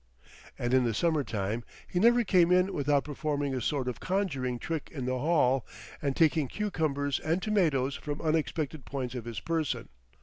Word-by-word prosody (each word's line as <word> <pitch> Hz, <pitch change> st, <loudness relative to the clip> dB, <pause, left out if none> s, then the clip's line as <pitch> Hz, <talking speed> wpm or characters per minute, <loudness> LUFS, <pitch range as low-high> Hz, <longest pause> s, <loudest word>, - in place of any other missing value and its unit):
And 120 Hz, +1 st, -1 dB
in 130 Hz, -1 st, +5 dB
the 115 Hz, -3 st, 0 dB
summer 160 Hz, +1 st, +2 dB
time 110 Hz, 0 st, -2 dB, 0.2 s
he 175 Hz, -, -1 dB
never 240 Hz, +4 st, +5 dB
came 180 Hz, -4 st, +4 dB
in 180 Hz, +2 st, +4 dB
without 145 Hz, 0 st, +2 dB
performing 145 Hz, -1 st, -2 dB
a 130 Hz, -, -2 dB
sort 135 Hz, +1 st, -1 dB
of 125 Hz, -, -3 dB
conjuring 145 Hz, -11 st, -1 dB
trick 160 Hz, +6 st, -4 dB
in 135 Hz, -5 st, -4 dB
the 130 Hz, 0 st, -1 dB
hall, 135 Hz, -5 st, +3 dB, 0.4 s
and 140 Hz, -3 st, -1 dB
taking 160 Hz, -3 st, +3 dB
cucumbers 150 Hz, -8 st, -1 dB
and 165 Hz, +3 st, 0 dB
tomatoes 160 Hz, -10 st, +1 dB
from 145 Hz, 0 st, -5 dB
unexpected 155 Hz, -2 st, -1 dB
points 130 Hz, -3 st, -4 dB
of 125 Hz, -3 st, -5 dB
his 115 Hz, -3 st, -4 dB
person. 160 Hz, +2 st, -2 dB
145 Hz, 175 wpm, -29 LUFS, 130-165 Hz, 0.4 s, in